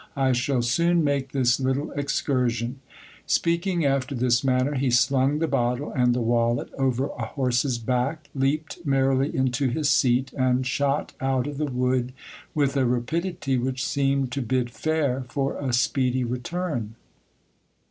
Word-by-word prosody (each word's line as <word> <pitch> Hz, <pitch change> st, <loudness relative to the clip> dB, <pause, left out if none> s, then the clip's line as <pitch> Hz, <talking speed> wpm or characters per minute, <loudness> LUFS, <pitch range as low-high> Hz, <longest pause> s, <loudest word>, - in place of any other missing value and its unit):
I 135 Hz, -1 st, +2 dB
shall 125 Hz, 0 st, +1 dB
soon 170 Hz, +8 st, +2 dB
make 140 Hz, -2 st, 0 dB
this 125 Hz, -3 st, +2 dB
little 130 Hz, +3 st, -1 dB
excursion^ 125 Hz, -3 st, -1 dB, 0.5 s
Speaking 170 Hz, 0 st, +1 dB
after 135 Hz, 0 st, 0 dB
this 120 Hz, 0 st, +2 dB
manner, 130 Hz, +2 st, +1 dB
he 135 Hz, -1 st, 0 dB
slung 135 Hz, +3 st, +3 dB
the 165 Hz, +1 st, 0 dB
bottle 125 Hz, +1 st, -1 dB
and 125 Hz, -1 st, +2 dB
the 125 Hz, -, 0 dB
wallet 115 Hz, 0 st, +1 dB
over 135 Hz, 0 st, 0 dB
a 115 Hz, -, -1 dB
horse's 125 Hz, 0 st, 0 dB
back, 130 Hz, +6 st, -2 dB
leaped 145 Hz, +3 st, -1 dB
merrily 135 Hz, -1 st, +2 dB
into 130 Hz, +1 st, +1 dB
his 145 Hz, +3 st, +1 dB
seat, 130 Hz, +1 st, +2 dB
and 130 Hz, -1 st, +1 dB
shot 140 Hz, +3 st, 0 dB
out 130 Hz, -1 st, +1 dB
of 145 Hz, -1 st, -5 dB
the 155 Hz, -, +1 dB
wood 125 Hz, -1 st, 0 dB, 0.4 s
with 140 Hz, -2 st, +1 dB
a 135 Hz, -2 st, +2 dB
rapidity 135 Hz, +3 st, -1 dB
which 130 Hz, +2 st, -2 dB
seemed 140 Hz, -3 st, 0 dB
to 140 Hz, -, -2 dB
bid 125 Hz, 0 st, -1 dB
fair 140 Hz, +1 st, -1 dB
for 140 Hz, -1 st, -1 dB
a 135 Hz, -3 st, -2 dB
speedy 130 Hz, 0 st, +1 dB
return. 125 Hz, -1 st, -3 dB
130 Hz, 150 wpm, -25 LUFS, 125-140 Hz, 0.5 s, slung